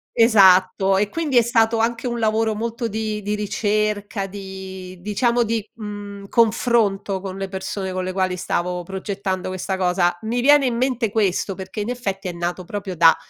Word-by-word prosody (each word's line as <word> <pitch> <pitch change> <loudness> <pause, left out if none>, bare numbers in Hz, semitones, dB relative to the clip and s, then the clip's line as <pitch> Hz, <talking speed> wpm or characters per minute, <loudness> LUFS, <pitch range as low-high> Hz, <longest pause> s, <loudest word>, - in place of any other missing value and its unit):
Esatto, 195 -4 +5
e 205 +1 +1
quindi 300 -4 0
è 235 - +7
stato 225 -1 +2
anche 230 +2 0
un 240 -1 -2
lavoro 220 0 +1
molto 230 +2 -3
di 215 0 -3
di 210 +1 -2
ricerca, 210 0 -1
di 190 -1 -8
diciamo 235 +5 +1
di, 225 -1 -1
mhmm, 205 -2 -7
confronto 215 -4 +2
con 190 0 -6
le 195 - -3
persone 190 0 -4
con 185 0 -2
le 185 - -3
quali 185 -1 0
stavo 180 0 -2
progettando 190 0 -4
questa 185 +1 -3
cosa. 180 -1 +1
Mi 235 +3 -1
viene 290 +1 +6
in 245 - 0
mente 245 -3 0
questo 200 -2 0
perché, 190 +3 -6
in 210 - -3
effetti, 195 -6 -4
è - - -2
nato 175 +1 -3
proprio 195 0 -5
da, 165 -1 +6
205 Hz, 175 wpm, -21 LUFS, 190-225 Hz, -, è